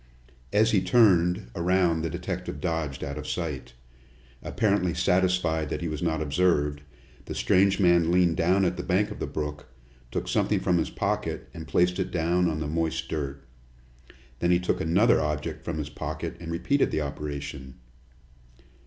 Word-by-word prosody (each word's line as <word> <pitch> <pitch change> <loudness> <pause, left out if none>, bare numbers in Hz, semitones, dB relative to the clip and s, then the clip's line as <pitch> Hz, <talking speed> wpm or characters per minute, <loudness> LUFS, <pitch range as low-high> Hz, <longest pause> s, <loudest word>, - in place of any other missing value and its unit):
As 110 +2 +3
he 100 -4 +3
turned 90 - +3
around 90 -2 +2
the 80 - -2
detective 90 +1 -5
dodged 80 -6 -2
out 70 +2 -4
of 75 - -7
sight. 75 -8 -4 0.7
Apparently 100 -6 0
satisfied 90 -3 +1
that - - -3
he 85 - -2
was 75 -2 -4
not 80 -2 0
observed, 75 -2 +1 0.4
the - - -6
strange 95 +1 +3
man 85 -3 +4
leaned 90 -2 +3
down 95 +3 +2
at 90 0 -1
the - - -4
bank 95 +3 +1
of - - -8
the - - -3
brook, 75 -2 -5 0.4
took - - -3
something - - +1
from 90 -1 +1
his - - -1
pocket - - -2
and 80 0 -8
placed 90 +3 +2
it 95 - -1
down 85 +1 +1
on 80 -1 -2
the 75 - -3
moist 80 +1 -2
dirt. 70 -3 -4 1.0
Then 85 - +1
he 90 0 +4
took 90 - -1
another 95 +9 +3
object 75 +1 -3
from 85 -2 -4
his 75 -1 -4
pocket 80 +2 -5
and 85 -1 -6
repeated 140 +12 +1
the 80 - -1
operation. 70 -2 -6
85 Hz, 170 wpm, -26 LUFS, 75-90 Hz, 1.0 s, man